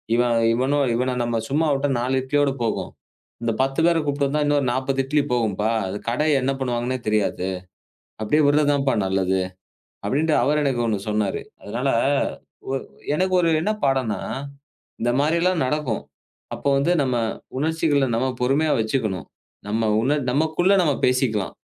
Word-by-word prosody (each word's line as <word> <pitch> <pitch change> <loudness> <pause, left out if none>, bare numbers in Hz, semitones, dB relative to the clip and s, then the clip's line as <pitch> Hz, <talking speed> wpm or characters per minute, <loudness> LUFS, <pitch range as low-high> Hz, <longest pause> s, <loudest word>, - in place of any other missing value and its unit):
இவன். 120 -1 +2 0.2
இவன 130 +5 +1 0.2
இவன 125 +2 0
நம்ம 120 -1 -1
சும்மா 155 +4 +1
விட்டா 140 +1 0
நாலு 130 +2 0
இட்லியோட 145 +1 +1
போகும். 115 - -2 0.5
இந்த 115 - +1
பத்து 135 +2 0
பேரை 170 -1 +3
கூப்பிட்டு 145 0 0
வந்தா 150 +2 0
இன்னொரு 145 -1 +2
நாற்பது 135 +2 -1
இட்லி 150 +2 +2
போகும்ப்பா. 110 -3 0 0.4
கடை 140 +6 0
என்ன 130 +2 0
பண்ணுவாங்கன்னே 125 0 -1
தெரியாது. 105 -3 0 0.7
அப்படியே 150 +9 +2
விடுறதான்ப்பா 145 -2 +3
நல்லது" 95 0 +1 0.7
அப்படின்னு 155 +4 +1
அவரு 145 +4 +2
எனக்கு 130 -4 0
ஒண்ணு 110 -3 0
சொன்னாரு. 105 -2 0 0.2
அதனால - - -3 1.3
எனக்கு 185 +4 +1
ஒரு 170 - +2
என்ன 210 +7 0
பாடம்னா, 130 -6 +1 0.8
இந்த 120 +1 +2
மாதிரி 155 +4 +2
எல்லாம் 180 -4 +2
நடக்கும். 130 -5 -1 0.5
அப்ப - - -14
வந்து 140 +5 +2
நம்ம 125 -2 0 0.4
உணர்ச்சிகளை 150 -2 +1
நாம 130 +3 0
பொறுமையா 140 +5 +2
வச்சுக்கணும். 110 - -1 0.4
நம்ம 110 +1 0
உன 140 +5 +1
நமக்குள்ள 160 +6 +2
நாம 150 -4 +2
பேசிக்கலாம். 125 -6 0
135 Hz, 140 wpm, -23 LUFS, 115-150 Hz, 1.3 s, பேரை